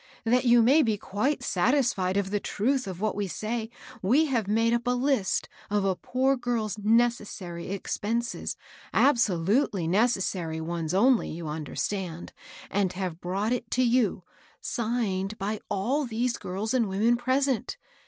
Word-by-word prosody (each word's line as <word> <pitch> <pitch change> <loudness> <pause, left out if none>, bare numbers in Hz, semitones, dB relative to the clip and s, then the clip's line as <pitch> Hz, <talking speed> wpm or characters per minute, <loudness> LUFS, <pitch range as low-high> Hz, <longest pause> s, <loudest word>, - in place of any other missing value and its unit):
That 245 +3 +2
you 240 -1 +6
may 275 +7 +6
be 220 -6 +1
quite 245 +8 -1
satisfied 200 -3 +1
of 195 -1 -1
the 205 - +1
truth 250 +4 -1
of 185 -1 -6
what 215 -1 0
we 205 -1 -2
say, 220 +4 -3 0.3
we 260 +12 +4
have 240 -8 0
made 225 +2 +2
up 235 +1 -1
a 250 0 +2
list 255 -7 +1 0.2
of 205 -1 +1
a 190 -1 +1
poor 265 +7 +1
girl's 235 -5 -2
nec 230 +3 +4
essary 180 -7 -8
expenses, 225 +4 -3 0.2
— - - -23
absolutely 205 - +2
necessary 185 -5 +1
ones 165 +1 -3
only, 245 +4 +4
you 165 0 -6
understand, 165 +3 -4 0.2
— - - -16
and 190 -2 +1
have 180 -3 -4
brought 195 +6 -1
it 250 - -3
to 255 - +2
you, 235 -7 +2 0.4
signed 215 -4 -2
by 210 +1 -3
aU 260 +9 0
these 240 +1 -1
girls 200 +5 -3
and 235 -5 +2
women 215 +5 +2
present. 255 0 0
215 Hz, 160 wpm, -27 LUFS, 190-245 Hz, 0.4 s, you